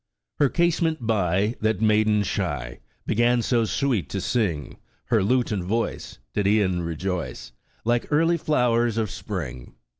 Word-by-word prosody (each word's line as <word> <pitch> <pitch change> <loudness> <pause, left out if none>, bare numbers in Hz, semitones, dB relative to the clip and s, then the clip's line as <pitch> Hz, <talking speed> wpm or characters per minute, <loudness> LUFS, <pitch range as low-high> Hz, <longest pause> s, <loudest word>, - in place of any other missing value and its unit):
Her 145 -2 +4
casement 165 -1 +1
bv. 100 0 +1
That 110 -2 0
maiden 110 -1 +3
shy, 70 -11 -3 0.3
Began 120 +1 +2
so 120 -2 +2
sweet 110 - 0
to - - -3
sing: 85 -12 -1 0.3
Her 115 -4 +3
lute 125 +5 +1
and 100 -4 -1
voice 115 +6 -2 0.2
Did 100 -1 +1
e'en 100 -4 +2
rejoice. 85 -7 -4 0.3
Like 120 +1 +1
early 165 +3 +3
flowers 120 -7 +1
of 110 -3 -1
spring. 65 - -6
110 Hz, 140 wpm, -24 LUFS, 90-120 Hz, 0.3 s, Her